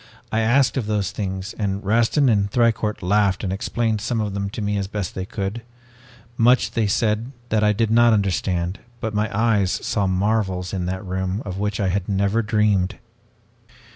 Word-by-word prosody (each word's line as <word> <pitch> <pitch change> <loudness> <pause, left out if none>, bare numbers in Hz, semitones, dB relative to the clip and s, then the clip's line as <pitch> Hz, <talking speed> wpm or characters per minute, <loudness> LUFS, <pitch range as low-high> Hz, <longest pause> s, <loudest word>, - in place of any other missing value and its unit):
I 110 - +1
asked 125 +5 +3
of 120 -5 -1
those 105 -4 0
things 95 0 -4
and 100 -1 -2
Rastin 115 +7 +3
and 100 -4 +2
Thicourt 110 -4 +1
laughed 100 +1 +2
and 95 -2 -1
explained 110 +2 -1
some 115 +1 -1
of 105 -2 -2
them 100 0 -2
to 105 - -7
me 105 -1 -1
as 100 -1 -2
best 100 -3 -4
they 95 0 -5
could. 100 +4 -4 0.8
Much 120 +2 +4
they 110 -2 0
said 110 +4 0 0.2
that 110 -1 +2
I 105 - +4
did 110 +1 0
not 120 +1 +5
understand 95 -3 0 0.2
but 110 -2 -3
my 105 +1 0
eyes 105 -4 +2
saw 100 0 -1
marvels 95 -1 0
in 90 -2 -2
that 95 +1 -4
room 95 +2 -2
of 95 -1 -5
which 105 0 -2
I 100 -2 +1
had 95 +1 -2
never 100 +3 +1
dreamed. 105 -3 +1
105 Hz, 185 wpm, -22 LUFS, 95-110 Hz, 0.8 s, not